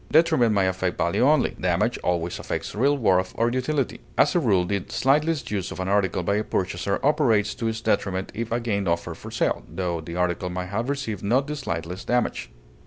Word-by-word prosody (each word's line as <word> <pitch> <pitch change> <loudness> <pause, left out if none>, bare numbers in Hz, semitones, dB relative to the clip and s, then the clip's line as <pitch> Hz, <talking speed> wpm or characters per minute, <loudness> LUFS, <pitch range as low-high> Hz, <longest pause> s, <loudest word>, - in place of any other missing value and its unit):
Detriment 140 -7 +4
may 100 -3 +2
affect 95 -1 -1
value 85 0 +1
only; 145 0 +4
damage - - +1
always 85 -1 -1
affects - - -4
real 140 +7 +2
worth 95 -6 +2
or 115 +1 +2
utility; 130 +2 -1 0.2
as 145 - +4
a 175 - +3
rule, 100 - +2
the 100 0 -1
slightest 150 +2 +1
use 100 -3 -2
of - - -7
an 95 - -2
article 95 -2 +1
by 100 +4 +1
a 105 - 0
purchaser 95 0 -1
operates 115 -8 +3
to 115 - -3
its 110 0 -2
detriment 95 -3 0
if 115 +2 -4
again 115 -5 -1
offered 85 0 -1
for - - -10
sale, - - 0
tho 90 -3 -2
the 85 +2 -7
article 90 0 0
may 90 0 -3
have 110 +7 -3
received 135 -9 -3
not 125 +7 +2
the 150 +1 -4
slightest 90 - -5
damage. 120 - 0
105 Hz, 200 wpm, -24 LUFS, 90-125 Hz, 0.2 s, Detriment